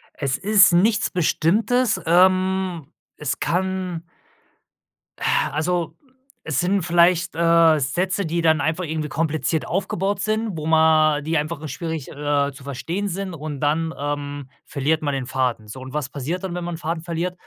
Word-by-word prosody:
Es 140 -1 -1
ist 200 -3 +5
nichts 205 +4 +3
Bestimmtes. 210 +6 +1
Ähm, 185 -2 +2 0.3
es 150 - -3
kann 185 -1 -2 1.2
äh, - - -7 0.3
also 170 +2 -1 0.5
es 160 -5 -1
sind 190 +2 +1
vielleicht, 170 0 +3
äh, 165 -2 +4
Sätze, 185 +8 -1
die 170 +1 -1
dann 160 -2 +3
einfach 160 +4 -1
irgendwie 155 -1 -3
kompliziert 160 +1 -1
aufgebaut 195 +1 -1
sind, 215 -3 -1
wo 155 - -5
ma 160 -1 +4
die 160 +2 -1
einfach 150 +1 -2
nur 155 - -7
schwierig, 160 -2 -5
äh, 145 -1 0
zu 135 +1 -13
verstehen 165 +9 -3
sind 190 +1 -4
und 150 -3 -6
dann, 160 +3 0
ähm, 145 -1 -4 0.2
verliert 150 +3 0
man 145 -1 -1
den 135 -2 -2
Faden. 125 -4 -1
So 130 +5 -8
und 130 +1 -9
was 150 -3 -2
passiert 155 +7 -4
dann, 180 -2 -4
wenn 180 - -4
man 175 0 -4
'n - - -7
Faden 160 0 -4
verliert? 170 +1 -3
165 Hz, 165 wpm, -22 LUFS, 150-180 Hz, 1.2 s, ist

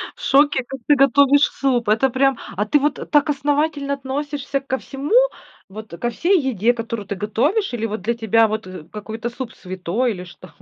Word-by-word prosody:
в - - -16
шоке, 280 -1 +3
как 265 +2 -8
ты 295 - +6
готовишь 280 +1 +4
суп! 245 -5 0
Это 225 +5 +3
прям 265 0 +2 0.2
а 205 - 0
ты 290 +7 +3
вот 290 +1 -2
так 295 0 +3
основательно 290 0 0
относишься 280 +1 -3
ко 265 -1 -2
всему, 280 - -3 0.5
вот 215 +2 -9
ко 240 - -1
всей 360 +9 +2
еде, 240 -5 +1
которую 230 -3 -5
ты 200 - -3
готовишь? 255 - 0
Или 225 -2 -2
вот 215 -2 -4
для 230 +5 0
тебя 225 -1 +3
вот 215 -2 -4 0.2
какой-то 220 +2 -5
суп 240 0 -7
святой 190 +6 -2
или 180 -4 -6
что? 175 -2 -14
255 Hz, 185 wpm, -21 LUFS, 220-280 Hz, 0.5 s, ты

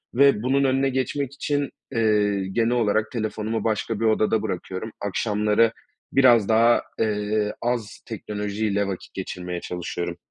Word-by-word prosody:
ve 135 -4 +5
bunun 135 +2 +2
önüne 135 0 +2
geçmek 135 +1 -2
için, 145 0 -1 0.2
eee, 105 -4 +2
genel 115 +3 +1
olarak 110 -2 +1
telefonumu 110 -1 -2
başka 110 0 -1
bir 115 - 0
odada 110 0 +2
bırakıyorum. 95 +1 -4
Akşamları 105 +2 +2 0.4
biraz 120 -6 +5
daha, 115 +2 +5 0.2
eee, 105 -1 0
az 115 -4 -2
teknolojiyle 105 -1 -2
vakit 95 -2 -6
geçirmeye 90 -2 -5
çalışıyorum. 85 -1 -4
110 Hz, 130 wpm, -24 LUFS, 105-120 Hz, 0.4 s, ve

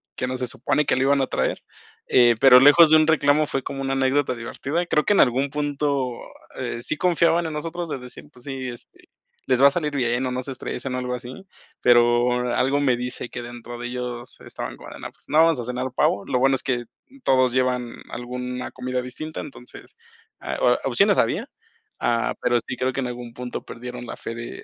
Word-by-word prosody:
¿qué - - -2
no 130 0 -3
se 125 - -2
supone 150 +4 0
que - - +3
lo 130 - +1
iban 140 0 +3
a 135 - 0
traer?", - - -1 0.4
eh, 120 -1 +5
pero 130 -2 +9
lejos 145 +4 +8
de - - +8
un 155 - +4
reclamo 150 -1 +3
fue 135 - -2
como 135 -1 -5
una 135 0 -1
anécdota 135 0 +1
divertida. 140 +8 -3
Creo 150 - +1
que - - +3
en - - +3
algún 135 +3 +2
punto, 145 -3 -1 0.5
eh, 115 - -4
sí 155 - -1
confiaban 170 -1 +2
en 160 - -4
nosotros 165 +2 -4
de 140 - -4
decir, 125 0 -11
pues 125 - -16
sí, 135 -2 -5
este: 120 -1 -13 0.4
"Les 130 0 +2
va 140 - +9
a - - +4
salir 150 -1 -2
bien 120 -1 0
o 130 - -2
no 125 0 -2
se 135 - -5
estresen" 130 0 -5
o - - -1
algo 125 0 -3
así, 125 +9 -9 0.4
pero, 120 0 +3
algo 135 +2 +2
me 130 -4 +2
dice 125 0 -5
que 125 - -6
dentro 120 0 -9
de 120 - -5
ellos 125 -1 -6
estaban - - -7
como - - -11
de - - -10
no, - - -7
pues - - -17
no, 150 - +1
vamos 165 -5 +3
a - - -3
cenar 125 +1 -3
el 130 - -4
pavo. 100 - +1
Lo 125 - 0
bueno 135 +1 +4
es 130 - -1
que 120 -2 -1 0.4
todos 130 -2 +3
llevan 125 -2 0
alguna 125 +1 -5
comida 125 0 -3
distinta, 155 +5 -6
entonces, 130 -4 -12 0.5
ah, - - -4
o - - +4
opciones - - +3
había. - - 0 0.5
Ah, 115 -1 +1
pero 120 0 +2
sí 125 - -4
creo 130 +1 -1
que - - -3
en 125 - -2
algún 120 -1 -7
punto 125 0 -6
perdieron 125 0 -8
la - - -7
fe 115 - -6
de 120 0 -8
130 Hz, 225 wpm, -23 LUFS, 125-140 Hz, 0.5 s, pero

